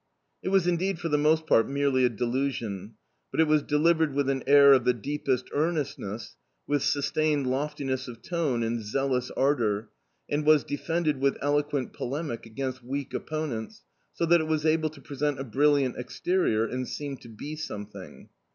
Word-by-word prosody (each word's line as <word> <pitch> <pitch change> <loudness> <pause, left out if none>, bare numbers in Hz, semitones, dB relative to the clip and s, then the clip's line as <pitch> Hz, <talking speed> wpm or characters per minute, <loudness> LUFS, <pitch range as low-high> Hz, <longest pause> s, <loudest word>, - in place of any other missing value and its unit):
It - - -2
was 190 -2 +3
indeed 180 +2 0
for 165 0 -3
the 150 - +2
most 155 +2 +3
part 115 -4 +3
merely 140 -2 +2
a 125 - +5
delusion, 115 -4 -3 0.3
but - - -5
it - - +7
was 155 -1 +3
delivered 155 0 +2
with 140 -1 +1
an 135 -1 0
air 140 0 +8
of 130 -2 +4
the 125 0 +2
deepest 130 0 -2
earnestness, 145 - -2 0.3
with 145 -1 0
sustained 145 +1 +1
loftiness 135 0 -2
of 115 -2 -10
tone 150 -9 -1
and 115 0 -1
zealous 125 +3 -1
ardour, 115 -6 +1 0.4
and 145 +1 -1
was 155 -1 +5
defended 155 -1 -1
with 140 0 +2
eloquent 145 -2 0
polemic 130 -3 -4
against 130 +2 -4
weak 140 +2 -4
opponents, 155 - -4 0.3
so 170 - -1
that 170 0 +5
it 160 - -3
was 155 -1 0
able 160 0 +2
to 150 -2 -15
present 145 +1 -2
a - - -2
brilliant 140 +1 +2
exterior 125 -3 0
and 125 +1 -3
seemed 140 -2 -5
to 120 - -12
be 145 +8 -7
something. 105 -10 -8
140 Hz, 170 wpm, -27 LUFS, 125-155 Hz, 0.4 s, air